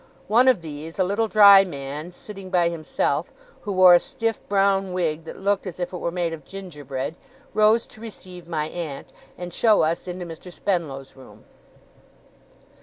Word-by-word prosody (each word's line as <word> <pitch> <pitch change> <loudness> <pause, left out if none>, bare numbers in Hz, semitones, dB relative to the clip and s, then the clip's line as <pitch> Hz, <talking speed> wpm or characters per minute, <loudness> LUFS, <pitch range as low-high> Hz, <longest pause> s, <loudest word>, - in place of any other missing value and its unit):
One 235 +5 +4
of 235 -10 +4
these, 155 +1 -8
a 190 - +3
little 205 +5 0
dry 200 -2 +8
man, 150 -1 -6
sitting 195 +1 -10
by 175 -2 +2
himself, 165 -2 -2 0.3
who 205 - -5
wore 185 -1 +8
a 175 - +7
stiff 225 +2 -3
brown 195 -1 +2
wig 165 -3 -1
that - - -9
looked 200 0 -1
as 180 -1 -7
if 175 +1 -4
it - - -3
were 170 - -2
made 170 -1 -2
of 155 -3 -8
gingerbread, 145 -7 -6 0.4
rose 215 +2 +4
to 220 - -15
receive 185 -6 -10
my 155 -3 -2
aunt, 160 -4 -7 0.2
and 175 -1 -7
show 220 -6 +4
us 165 +3 -1
into 180 0 -5
Mr. 170 +2 -10
Spenlow's 160 -9 -3
room. 130 -1 -16
180 Hz, 175 wpm, -23 LUFS, 160-195 Hz, 0.4 s, dry